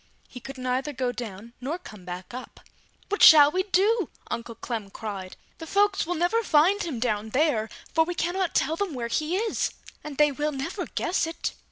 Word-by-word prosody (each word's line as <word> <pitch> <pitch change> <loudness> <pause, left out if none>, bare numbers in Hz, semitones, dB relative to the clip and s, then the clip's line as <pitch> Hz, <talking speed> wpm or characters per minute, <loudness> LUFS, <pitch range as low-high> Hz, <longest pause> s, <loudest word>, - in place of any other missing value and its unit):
He 250 - -10
could 270 +2 -9
neither 255 +3 -1
go 255 -1 -1
down 230 -2 -7
nor 290 +7 -2
come 210 - -12
back 180 +2 -7
up. 255 - -9 0.5
"What 410 - -1
shall 295 -2 +10
we 370 - +1
do?" 400 +1 +2 0.2
Uncle 235 0 -4
Clem 225 -5 -5
cried, 195 -3 -7 0.2
"The 325 - -7
folks 400 -2 +2
will 355 - -1
never 350 +8 +2
find 375 +2 +4
him 305 -9 -3
down 220 -2 -1
there, 250 -4 +1 0.2
for 320 - +5
we 350 +2 -4
can 345 +1 -1
not 375 -3 -1
tell 315 - +2
them 365 -4 -2
where 235 -2 -3
he 310 +8 0
is, 445 +2 0 0.3
and 300 -2 -7
they 300 -1 +5
will 295 +2 -2
never 335 +7 -4
guess 345 -1 0
it!" 325 - -4
295 Hz, 200 wpm, -26 LUFS, 235-355 Hz, 0.5 s, shall